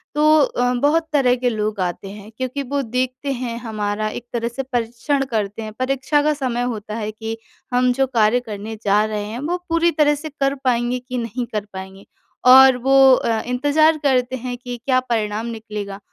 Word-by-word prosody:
तो 305 +1 +5
अ, 245 -2 +1
बहुत 300 +6 +1
तरह 255 -4 +4
के 250 0 0
लोग 215 -2 -2
आते 180 +2 -3
हैं 205 +1 -11
क्योंकि 260 +2 -3
वो 280 +2 -2
देखते 255 +3 -2
हैं, 240 -3 -4
हमारा 215 -2 -3
एक 235 - -7
तरह 235 -1 -1
से 240 +3 -4
परीक्षण 245 +3 -1
करते 210 -1 -2
हैं। 215 - -6
परीक्षा 270 +3 +1
का 305 - +2
समय 255 -4 -2
होता 215 0 -7
है 215 -1 -3
कि 225 +1 -6 0.4
हम 250 0 +3
जो 270 +1 +1
कार्य 230 -1 +3
करने 220 -2 -7
जा 205 +1 +3
रहे 210 -1 -3
हैं, 220 +3 -6
वो 330 +6 -2
पूरी 335 +1 +3
तरह 295 -2 +3
से 305 +2 -7
कर 275 -1 -1
पाएँगे 245 0 +1
कि 255 0 -6
नहीं 240 +1 -3
कर 210 -1 -2
पाएँगे। 190 +1 -9 0.5
और 265 0 +8
वो 270 +1 +6
अ, 225 -3 -1
इंतज़ार 290 +6 +3
करते 255 -2 +1
हैं 250 0 -5
कि 245 0 -7
क्या 255 -2 +3
परिणाम 220 -3 -2
निकलेगा। 210 -3 -6
245 Hz, 195 wpm, -20 LUFS, 220-270 Hz, 0.5 s, और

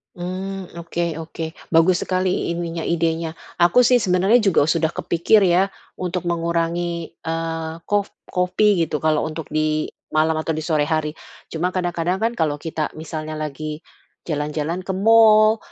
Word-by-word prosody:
Mmm. 185 0 -5
Oke 170 -1 -3
oke. 160 0 -6 0.2
Bagus 175 +2 +4
sekali 185 -2 0
ininya 170 -1 -4
idenya. 165 -1 0 0.2
Aku 175 +8 +5
sih 250 +1 +5
sebenernya 190 +2 +3
juga 195 -9 +3
sudah 165 -1 +1
kepikir 170 +6 +2
ya 190 +1 +3 0.2
untuk 180 -1 -3
mengurangi, 170 0 -1 0.2
eee, 165 0 -3 0.2
kof 205 -1 0 0.2
kopi 180 0 +2
gitu 150 -1 -3
kalau 155 -1 +2
untuk 160 0 -6
di 155 0 0 0.2
malam 155 +1 +2
atau 160 +1 -1
di 155 - -3
sore 155 -2 +1
hari. 155 -1 -1 0.3
Cuma 175 +3 -2
kadang-kadang 175 +1 -1
kan 230 +1 +2
kalau 150 -3 0
kita 160 -2 -3
misalnya 155 0 -6
lagi 155 0 -5 0.5
jalan-jalan 155 +4 -2
ke 190 - -2
mall, 215 +2 +6
170 Hz, 145 wpm, -21 LUFS, 160-185 Hz, 0.5 s, mall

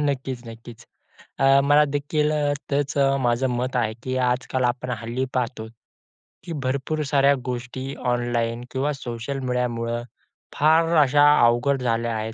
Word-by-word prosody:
नक्कीच, 135 -3 -2
नक्कीच. 115 +1 -11 0.5
अ, 135 0 +5
मला 145 +1 +5
देखील 145 +1 -1 0.4
त्याचं 140 -1 +1
माझं 120 +1 +1
मत 125 +1 -2
आहे 110 -3 0
की 130 0 -3
आजकाल 125 0 0
आपण 125 +1 -1
हल्ली 120 +2 -3
पाहतो, 120 -3 -2 0.8
की 170 - -6
भरपूर 140 +4 -2
साऱ्या 140 0 +4
गोष्टी 125 +2 -5 0.2
ऑनलाईन 120 -1 -1
किंवा 140 +3 -1
सोशल 125 +1 -5
मीडियामुळं, 120 -2 -2 0.5
फार 165 +3 +3
अशा 145 +1 +4 0.2
अवघड 125 +3 +2
झाल्या 115 -1 0
आहेत, 110 +1 -4
130 Hz, 130 wpm, -23 LUFS, 120-140 Hz, 0.8 s, अ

